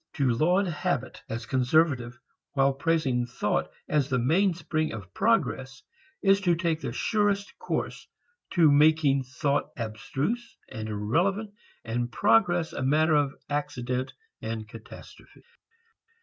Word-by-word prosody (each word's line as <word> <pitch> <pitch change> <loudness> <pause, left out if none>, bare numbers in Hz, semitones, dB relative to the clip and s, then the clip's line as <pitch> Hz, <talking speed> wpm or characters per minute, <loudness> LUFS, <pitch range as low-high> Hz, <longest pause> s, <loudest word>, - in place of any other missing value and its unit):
To 135 -4 +1
laud 175 +11 +2
habit 170 - -2
as 115 +1 -4
conservative 130 0 +1 0.4
while 135 -1 +3
praising 135 -4 0
thought 120 - -1 0.2
as 150 -2 +1
the 130 - +1
main 170 +9 +2
spring 155 -2 -2
of 100 -4 -9
progress 130 -1 0 0.4
is 195 0 +4
to 175 -3 +3
take 165 -1 -1
the 135 - -3
surest 205 - 0
course - - -3 0.5
to 165 -4 +5
making 145 -1 +4
thought 140 +3 -1
abstruse 135 - -3
and 110 0 -5
irrelevant 175 - 0 0.3
and 120 +1 -2
progress 165 +10 +3
a - - -4
matter 155 +4 +3
of 145 -2 +2
accident 130 -3 -2 0.3
and 110 -1 -4
catastrophe. 110 +1 -13
145 Hz, 125 wpm, -27 LUFS, 120-165 Hz, 0.5 s, to